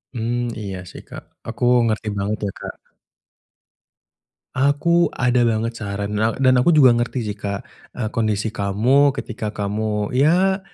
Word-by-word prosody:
Hmm, 115 +1 -2 0.2
iya 100 -3 -5
sih - - -11
Kak, - - -10 0.2
aku 115 +2 -5 0.2
ngerti 110 -1 -2
banget 100 +2 -2
ya, 100 - -2
Kak. - - -7 1.8
Aku 145 +6 +2
ada 125 -1 +2
banget 115 +1 -2
saran 100 -1 -4
na 110 +2 0
dan 130 -1 +3
aku 165 +6 +3
juga 135 -5 +7
ngerti 120 +1 -1
sih 105 -2 -5
Kak, 100 -1 -4 0.3
eee, 110 -4 -3
kondisi 110 -1 -1
kamu 120 +8 +2
ketika 120 -5 -5
kamu 105 0 -2
ya 175 +9 +3
115 Hz, 145 wpm, -21 LUFS, 105-130 Hz, 1.8 s, juga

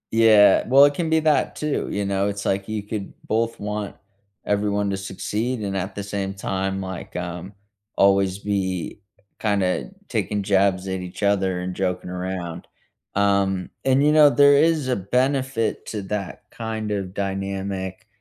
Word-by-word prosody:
Yeah. 110 -3 +6
Well, 135 +3 +7
it 145 - +3
can 165 +1 -2
be 160 0 +3
that 155 -1 +2
too, 150 -1 -2
you 100 0 -2
know? 100 0 0
It's 100 0 -4
like 95 +1 0
you 105 -2 -3
could 105 -2 -5 0.2
both 115 +1 0
want 105 -1 -4 0.5
everyone 100 -1 0
to 95 - -2
succeed 105 +5 -3
and 100 -1 -3
at 95 +1 -3
the 100 - -4
same 100 -1 -3
time, 95 0 -2
like, 95 -2 -7
um, 90 +2 -5 0.4
always 95 -1 +3
be 95 -2 -2 0.4
kinda 100 - 0 0.2
taking 105 -2 -1
jabs 95 -1 +2
at 95 0 -2
each 90 +3 -7
other 95 -3 +1
and 90 0 -4
joking 90 -1 -2
around. 90 -2 -5 0.5
Um, 100 -2 +1
and, 135 +1 +4
you 150 - +5
know, 150 -1 +7
there 145 0 +6
is 155 -2 +3
a 125 - +1
benefit 130 +3 0
to 105 -2 -4
that 100 -1 -5
kind 110 -2 -4
of 95 -2 -3
dynamic, 95 -1 -4
100 Hz, 160 wpm, -23 LUFS, 95-110 Hz, 0.5 s, Well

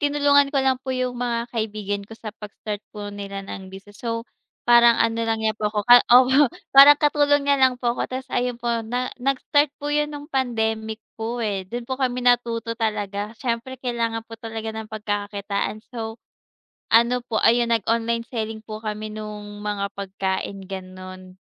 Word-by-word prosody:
tinulungan 285 -1 +4
ko 275 -2 0
lang 260 -1 +2
po 260 0 -3
yung 255 0 -1
mga 240 -1 -2
kaibigan 210 -3 -2
ko 225 - -10
sa 220 -2 -8
pag-start 210 0 -6
po 205 -1 -7
nila 200 -1 -6
ng 190 -1 -8
business. 195 +2 -13
So, 230 -1 -3 0.4
parang 235 -1 +6
ano 230 0 +1
lang 225 -1 -1
niya 220 - +2
po 210 0 -2
ako, 210 -1 -2
opo 250 +3 +7 0.2
parang 280 +2 +10
katulong 290 -1 +3
niya 280 -1 +2
lang 260 -1 +4
po 240 -1 0
ko - - -3
ta's 260 +1 -5
ayun 245 0 0
po 235 -1 -1
na 245 +3 -3
nag-start 275 +3 +2
po 290 +1 -4
'yon 295 0 +1
nung 290 -1 -7
pandemic 220 -6 -2 0.2
po, 230 +1 -2
eh, 195 -3 -3
dun 240 +3 -5
po 260 +2 -5
kami 250 -1 0
natuto 235 -2 +2
talaga 210 -1 -3
siyempre 235 +2 -3
kailangan 230 -3 -2
po 230 - -16
talaga 225 -1 -5
ng 220 0 -7
pagkakakitaan. 205 0 -3
So, 225 -2 -5 0.8
ano 235 +2 +5
po 220 - 0
ayun 235 0 +4
nag-online 230 +2 -1
selling 220 -2 -4
po 215 0 -7
kami 215 0 -4
nung 210 -1 -7
mga 205 -1 -2
pagkain 195 0 -3
gano'n. 185 -1 -9
230 Hz, 175 wpm, -23 LUFS, 210-250 Hz, 0.8 s, parang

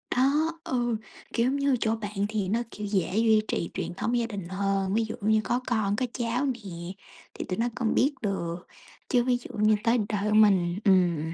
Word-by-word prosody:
Đó, 290 +6 +3
ừ, 240 -3 0 0.4
kiểu 245 +2 +2
như, 280 -1 +2
chỗ 220 0 +1
bạn 205 -2 -3
thì 210 -3 -1
nó, 230 +3 +1
kiểu, 210 -1 -5
dễ 195 -1 0
duy 220 -1 +4
trì 170 - -2
truyền 175 - -4
thống 235 +6 -1
gia 235 - +1
đình 200 -6 -6
hơn, 195 0 0
ví 225 +1 +2
dụ 220 - -5
như 215 +1 +3
có 245 - 0
con, 215 -4 +1
có 255 - 0
cháu 245 +3 -1
nè, 250 -3 -2 0.8
thì - - -5
tụi 185 - -2
nó 235 +1 +1
còn 235 -3 0
biết 280 +3 +3
được, 175 -4 -3 0.4
chứ 245 -3 +3
ví 250 -1 +2
dụ 245 - -11
như 215 +1 +4
tới 235 +1 +3
đời 210 0 -1
của 215 - +2
mình 190 -4 +4
ừm. 170 -4 +3
215 Hz, 210 wpm, -27 LUFS, 195-240 Hz, 0.8 s, duy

